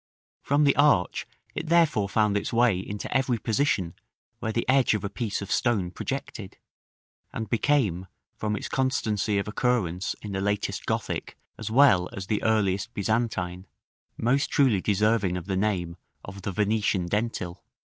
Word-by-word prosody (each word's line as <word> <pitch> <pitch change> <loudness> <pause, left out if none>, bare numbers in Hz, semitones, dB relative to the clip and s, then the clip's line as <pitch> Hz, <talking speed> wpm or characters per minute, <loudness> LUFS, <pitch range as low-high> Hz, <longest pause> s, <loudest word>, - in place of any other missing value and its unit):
From 145 +2 +2
the 140 -1 +4
arch 145 -12 +3 0.3
it 160 - -4
therefore 155 -12 +3
found 105 -1 +2
its 100 - -1
way 115 -5 +3
into 100 +2 -5
every 130 -2 +2
position 110 - 0 0.5
where 110 - -2
the 115 +1 -2
edge 130 -3 +4
of 105 - -3
a 100 - -3
piece 105 -3 -3
of 100 - -8
stone 105 -8 +1
projected, 115 -4 -5 0.7
and 110 -1 -5
became, 110 - +1 0.3
from 105 -1 -2
its - - -4
constancy 110 -6 0
of 100 - -1
occurrence 105 -6 0
in 105 - -6
the 95 0 -2
latest 105 +1 -2
Gothic - - -3 0.2
as - - -6
well 110 -8 +5
as 100 -4 -5
the 105 +1 -1
earliest 100 -3 0
Byzantine, 100 -4 -1 0.5
most 135 +5 +1
truly 125 -10 +3
deserving 105 -2 +1
of 85 - -6
the 95 0 -2
name 95 -4 -1 0.3
of 100 +1 -9
the 100 - -3
"Venetian 105 -1 +1
Dentil." 100 -3 -2
105 Hz, 155 wpm, -26 LUFS, 95-120 Hz, 0.7 s, well